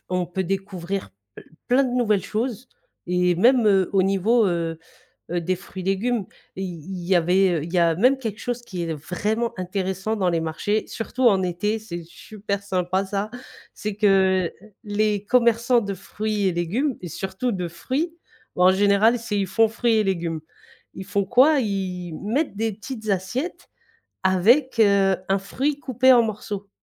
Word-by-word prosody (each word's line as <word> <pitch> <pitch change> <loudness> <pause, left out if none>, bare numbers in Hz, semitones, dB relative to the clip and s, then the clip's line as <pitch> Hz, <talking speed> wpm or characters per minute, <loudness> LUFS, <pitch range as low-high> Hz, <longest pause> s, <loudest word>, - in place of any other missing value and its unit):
On 180 -1 0
peut 185 +2 -3
découvrir 190 - -4
p 100 +1 -53 0.4
plein 255 +3 +4
de 255 - -2
nouvelles 215 -6 +2
choses 235 +2 -3 0.4
et 180 0 +2
même, 240 +5 +4
heu, 195 -3 +3
au 190 -1 +4
niveau, 205 +4 +3
heu 165 -2 -2 0.5
heu, 175 - 0
des 185 +3 0
fruits-légumes, 195 +4 -2 0.3
i 190 - -4
il 175 +1 -7
y 190 - +3
avait 175 -1 +3
il 165 - -7
y - - +1
a 170 -1 +4
même 255 +8 +4
quelque 220 -4 -5
chose 245 0 -3
qui 180 -6 -6
est 165 -1 -2
vraiment 210 +9 -2
intéressant 190 +3 -2
dans 190 -4 +1
les 165 -1 0
marchés, 185 +7 -1
surtout 235 +3 -4
en 195 -3 +2
été, 185 +5 -1
c'est 175 -6 -7
super 200 +4 -6
sympa 185 0 -1
ça, 200 +2 -3 0.5
c'est 210 -1 -4
que 190 -3 +3 0.3
les 210 -1 0
commerçants 235 +1 +3
de 200 -1 -3
fruits 210 +1 -2
et 185 - +2
légumes 220 - -1
et 175 - -6
surtout 190 - -3
de 180 -3 -3
fruits, 285 - -3 0.4
en 180 +1 +5
général, 200 +4 +4
c'est 225 -3 -2
ils 195 - +1
font 225 +4 +3
fruits 230 +1 +1
et 215 - +3
légumes. 170 -5 -2 0.5
Ils 190 - -7
font 200 +1 0
quoi? 270 - +5
Ils 185 -6 -3
mettent 250 +4 -1
des 225 -1 -1
petites 220 0 -7
assiettes 200 - -3 0.5
avec, 230 +8 +3
heu, 200 -3 +4
un 195 - +2
fruit 270 +9 -2
coupé 260 -1 +4
en 240 -2 +6
morceaux. 205 -2 -5
195 Hz, 170 wpm, -23 LUFS, 180-225 Hz, 0.5 s, en